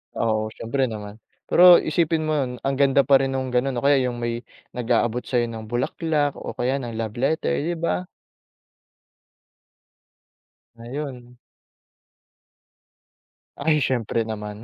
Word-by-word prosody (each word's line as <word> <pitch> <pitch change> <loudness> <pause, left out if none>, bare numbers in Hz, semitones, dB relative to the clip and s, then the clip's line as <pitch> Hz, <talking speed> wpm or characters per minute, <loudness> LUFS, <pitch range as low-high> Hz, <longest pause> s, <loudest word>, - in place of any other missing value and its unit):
Oo, 110 -1 0
siyempre 130 +4 -1
naman. 105 0 -8 0.3
Pero 180 0 +8
isipin 160 0 0
mo 155 - +1
yun, 130 -4 -1
ang 135 0 0
ganda 140 0 +4
pa 140 - +5
rin 135 0 0
nung 130 0 -2
ganun 125 +2 0
o - - -9
kaya 140 -1 +5
yung 120 -1 -4
may 120 0 -3 0.3
nag-aabot 120 0 0
sa'yo 120 -2 0
ng 110 -1 -8
bulaklak 145 +3 0
o - - -6
kaya 130 +3 0
ng 120 -3 -6
love 110 -2 -4
letter, 155 +5 0
di 175 +2 -1
ba? 180 +2 -1 2.7
Ngayon 125 0 -7 2.2
Ay 150 -1 +2
syempre 115 -3 0
naman. 105 0 -6
125 Hz, 130 wpm, -23 LUFS, 115-145 Hz, 2.7 s, Pero